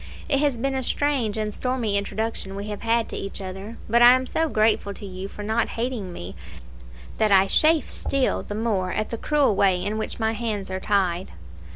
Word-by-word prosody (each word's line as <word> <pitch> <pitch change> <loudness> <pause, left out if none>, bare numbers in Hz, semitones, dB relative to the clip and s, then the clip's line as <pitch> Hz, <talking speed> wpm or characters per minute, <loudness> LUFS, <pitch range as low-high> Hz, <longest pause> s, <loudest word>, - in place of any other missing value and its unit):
It 275 - +2
has 285 -4 +1
been 270 +4 -1
a 265 - -1
strange 260 -5 0
and 215 -1 -2
stormy 250 -5 -1
introduction 200 -1 -2
we 200 +1 -5
have 210 - -5
had 230 0 +1
to - - -6
each 195 - -5
other; 195 +4 -7
but 235 +2 +3
I 240 +1 +10
am 255 0 +1
so 320 +4 0
grateful 215 -3 +2
to - - -9
you 190 0 -6
for 210 - -8
not 220 +2 0
hating 230 -6 -2
me, 95 - -8 0.8
that 215 -1 +3
I 195 -1 +6
chafe 310 +9 +3
still 275 -2 -1
the 205 - -6
more 205 -5 0
at 215 - -2
the 230 - -2
cruel 290 -8 +2
way 190 -2 +3
in 215 +2 -2
which 220 - -4
my 220 0 +1
hands 215 -4 -3
are 185 - -2
tied. 190 -3 0
215 Hz, 210 wpm, -24 LUFS, 195-240 Hz, 0.8 s, I